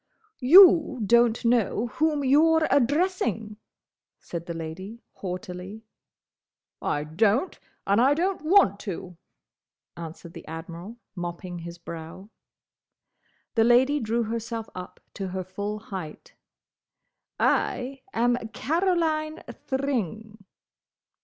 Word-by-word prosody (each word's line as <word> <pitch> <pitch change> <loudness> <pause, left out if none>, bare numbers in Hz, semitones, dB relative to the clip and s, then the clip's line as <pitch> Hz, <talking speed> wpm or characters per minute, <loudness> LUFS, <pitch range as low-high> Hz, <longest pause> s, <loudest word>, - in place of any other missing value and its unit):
"You 320 -1 +7
don't 235 +1 +3
know 230 -1 +2
whom 305 -2 +2
you're 315 +4 +4
addressing!" 265 - +1 0.6
said 170 -1 -7
the 170 - -3
Lady, 185 +8 -7
haughtily. 185 +3 -7 1.0
"I 145 - -1
don't, 205 - +1 0.3
and 200 +3 +3
I 275 +3 +4
don't 365 +3 -1
want 310 - +4
to," 185 -3 -6 0.8
answered 165 0 -9
the - - -11
Admiral, 170 +7 -8 0.2
mopping 175 0 -6
his 170 +1 -8
brow. 170 +4 -9 1.2
The 225 - +4
Lady 255 +5 +4
drew 230 0 0
herself 230 0 -4
up 180 0 -9
to 195 - -4
her 185 0 -4
full 200 +3 -5
height. 195 - -8 1.1
"I 265 +1 0
am 245 -2 +2 0.2
Caroline 320 -2 0
Thring!" 220 - -4
225 Hz, 100 wpm, -26 LUFS, 180-275 Hz, 1.2 s, You